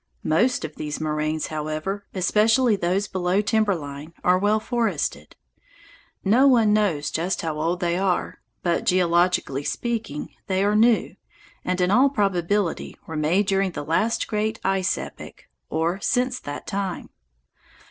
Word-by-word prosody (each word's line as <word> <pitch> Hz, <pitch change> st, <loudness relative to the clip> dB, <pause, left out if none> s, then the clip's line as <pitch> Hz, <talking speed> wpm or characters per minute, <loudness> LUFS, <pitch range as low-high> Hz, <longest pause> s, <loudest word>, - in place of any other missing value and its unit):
Most 225 Hz, +6 st, +2 dB
of 155 Hz, -, -9 dB
these 150 Hz, -1 st, -4 dB
moraines, 155 Hz, 0 st, -1 dB
however, 155 Hz, +6 st, -3 dB
especially 215 Hz, +5 st, +3 dB
those 190 Hz, +2 st, 0 dB
below 185 Hz, 0 st, 0 dB
timber 210 Hz, -1 st, +2 dB
line, 145 Hz, +1 st, -8 dB
are 180 Hz, +1 st, +4 dB
well 210 Hz, +2 st, +2 dB
forested. 210 Hz, -, -2 dB, 0.9 s
No 240 Hz, +8 st, +5 dB
one 230 Hz, -5 st, +5 dB
knows 195 Hz, -9 st, +1 dB
just 175 Hz, +4 st, -1 dB
how 155 Hz, -2 st, -3 dB
old 170 Hz, +4 st, -1 dB
they 175 Hz, 0 st, 0 dB
are, 190 Hz, -2 st, -1 dB, 0.2 s
but, 170 Hz, -1 st, +1 dB
geologically 175 Hz, -5 st, +2 dB
speaking, 225 Hz, -7 st, -3 dB
they 190 Hz, 0 st, +1 dB
are 205 Hz, +1 st, +2 dB
new, 225 Hz, +1 st, +3 dB, 0.5 s
and 180 Hz, 0 st, -1 dB
in 180 Hz, +1 st, +2 dB
all 260 Hz, +6 st, +5 dB
probability 195 Hz, -5 st, -1 dB
were 160 Hz, -, -7 dB
made 160 Hz, +7 st, +2 dB
during 195 Hz, -1 st, +1 dB
the -, -, -4 dB
last 215 Hz, +9 st, 0 dB
great 215 Hz, +1 st, -1 dB
ice 190 Hz, -1 st, +1 dB
epoch, -, -, -9 dB, 0.2 s
or 170 Hz, +4 st, -1 dB
since 250 Hz, +4 st, 0 dB
that 145 Hz, 0 st, -7 dB
time. 195 Hz, -2 st, -4 dB
185 Hz, 145 wpm, -24 LUFS, 165-210 Hz, 0.9 s, No